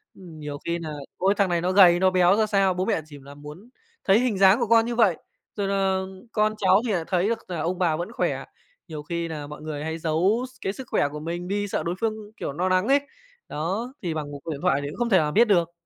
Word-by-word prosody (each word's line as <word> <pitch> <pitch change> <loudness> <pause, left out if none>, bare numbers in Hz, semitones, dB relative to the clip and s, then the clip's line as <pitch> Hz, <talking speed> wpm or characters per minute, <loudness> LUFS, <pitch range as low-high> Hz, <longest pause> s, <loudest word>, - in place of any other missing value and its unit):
Ừm. 170 -5 -12
Nhiều 145 -1 -6
khi 170 0 -1
là 160 -2 -6 0.3
ôi 195 +2 +2
thằng 200 -3 +2
này 170 -1 0
nó 180 +1 0
gầy 180 -3 +6
nó 190 0 +4
béo 180 +1 +4
ra 220 0 +2
sao, 195 -3 +2
bố 185 +1 -2
mẹ 160 - 0
chỉ 145 -2 -12
nà 140 +1 -13
muốn 150 +10 -12 0.3
thấy 195 +3 +4
hình 245 -6 0
dáng 195 +4 +6
của 235 - 0
con 230 0 +5
như 240 0 -3
vậy, 210 -8 +3 0.4
rồi 200 -2 -2
là 195 -1 +1 0.3
con 215 -1 +1
cháu 190 +1 +4
thì - - 0
lại 170 -3 0
thấy 185 +1 +1
được 230 0 -1
là 170 -3 -3
ông 180 +3 -2
bà 165 -4 +2
vẫn 175 +7 -5
khỏe. - - -2 0.4
Nhiều 150 -2 -7
khi 170 +1 -3
là 150 -3 -6
mọi 150 +1 -10
người 150 -1 -5
hay 160 +1 -3
giấu 175 +10 +1
s - - -21
cái 195 - -2
sức 260 +1 -9
khỏe 145 - +2
của 150 - -6
mình 170 +3 -5
đi, 205 +1 -1
sợ - - -2
đối 170 +2 -2
phương, 225 -1 0 0.2
kiểu, - - -4
no 180 +5 -1
nắng 185 +3 +2
ấy. 280 +1 +5 0.5
Đó, 195 - -3
thì 170 -4 -2
bằng 150 -2 -5
một 140 - -7
cuộc 165 - -5
điện 140 - -6
thoại 145 -6 +2
thì 145 - -4
cũng - - -9
không 240 -1 0
thể 190 - +5
nào 150 -2 +1
biết 235 +7 +5
được. 175 -5 +2
180 Hz, 275 wpm, -24 LUFS, 160-205 Hz, 0.5 s, gầy